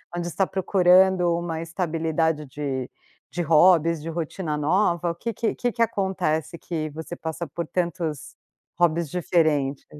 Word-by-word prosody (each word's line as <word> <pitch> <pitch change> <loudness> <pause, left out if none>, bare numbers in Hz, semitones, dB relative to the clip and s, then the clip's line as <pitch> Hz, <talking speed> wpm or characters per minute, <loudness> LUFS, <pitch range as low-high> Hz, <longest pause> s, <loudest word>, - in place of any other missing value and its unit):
onde 175 0 -3
está 185 +4 0
procurando 185 -1 +4
uma 165 -2 -3
estabilidade 160 -2 -1
de 135 -2 -4 0.4
de 175 - -2
hobbies, 165 0 +4
de 165 - -6
rotina 160 -1 -3
nova, 170 +2 +1
o - - -7
que 230 +6 -4
que 225 +1 -1
que 245 -1 -1
que 230 0 +1
acontece 180 -6 -1
que 155 -3 -4
você 160 +3 -7
passa 160 +1 -5
por 165 +2 -5
tantos 170 -4 -3 0.4
hobbies 170 -2 +2
diferentes? 150 -4 0
170 Hz, 145 wpm, -24 LUFS, 155-180 Hz, 0.4 s, procurando